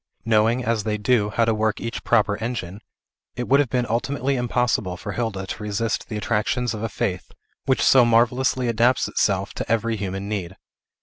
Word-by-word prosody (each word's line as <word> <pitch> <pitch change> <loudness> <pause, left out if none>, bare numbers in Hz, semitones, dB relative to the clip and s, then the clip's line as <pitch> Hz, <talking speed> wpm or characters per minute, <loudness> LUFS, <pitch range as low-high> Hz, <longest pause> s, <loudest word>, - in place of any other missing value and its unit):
Knowing, 115 +2 +2
as 115 -2 0
they 105 0 -1
do, 105 -1 +2
how 115 +3 +1
to 115 - +2
work 110 0 0
each 115 0 -5
proper 105 -3 +2
engine, 110 -4 -5 0.5
it 125 - -4
would 140 +1 +4
have 145 -4 +1
been 125 +1 0
ultimately 135 +4 -1
impossible 120 -6 0
for - - -6
Hilda 110 -5 -3
to 100 - -6
resist 105 +2 -2
the 110 - -3
attractions 115 +3 -1
of 105 - -6
a 115 - -2
faith, 95 -4 -3 0.4
which 130 - +2
so 130 -2 +6
marvellously 125 +2 +2
adapts 120 +2 +2
itself 100 -1 0
to - - -5
every 115 0 +1
human 95 0 -4
need. 95 -3 -4
115 Hz, 185 wpm, -23 LUFS, 105-120 Hz, 0.5 s, so